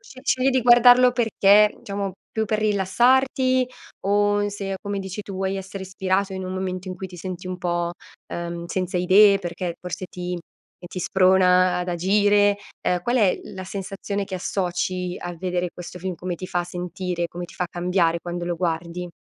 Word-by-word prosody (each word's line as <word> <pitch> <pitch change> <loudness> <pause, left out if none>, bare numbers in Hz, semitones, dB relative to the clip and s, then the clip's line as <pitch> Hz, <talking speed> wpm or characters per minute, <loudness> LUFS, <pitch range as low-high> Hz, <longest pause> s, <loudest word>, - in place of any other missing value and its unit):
Sce 255 +3 -14
scegli 260 -2 +2
di 260 -2 +1
guardarlo 245 +1 +7
perché, 210 -3 +4
diciamo 200 -1 -3 0.2
più 220 0 -1
per 215 0 -1
rilassarti, 255 +6 +3 0.4
o 205 0 +2
se, 195 -1 -4
come 200 -1 -3
dici 190 +1 -6
tu, 195 - -8
vuoi 190 +1 -1
essere 190 0 -6
ispirato 190 +1 -1
in 190 0 -4
un 185 - -4
momento 185 0 -4
in 185 - -4
cui 190 - -6
ti 180 -1 -12
senti 180 +1 -6
un 185 0 -4
po', 175 -1 -1 0.4
uhm, 170 0 -4
senza 185 0 -2
idee, 195 +3 +6
perché 175 -1 -4
forse 180 +1 -5
ti 180 0 -5 0.4
e 175 - -9
ti 185 - -6
sprona 185 -1 +4
ad 180 - -3
agire. 205 +3 +3 0.3
Ehm, 180 -1 +1
qual 240 +4 0
è 205 -6 +3
la 190 0 -8
sensazione 200 +1 -4
che 190 -1 -5
associ 180 -1 -2
a 175 0 -6
vedere 180 0 -2
questo 180 0 -8
film, 185 0 -4
come 180 0 -4
ti 185 - -6
fa 175 -2 -1
sentire, 180 0 -4
come 175 +1 -7
ti - - -15
fa 180 - -2
cambiare 175 -1 +1
quando 175 0 -5
lo 175 0 -1
guardi? 170 +1 -3
185 Hz, 185 wpm, -23 LUFS, 180-205 Hz, 0.4 s, guardarlo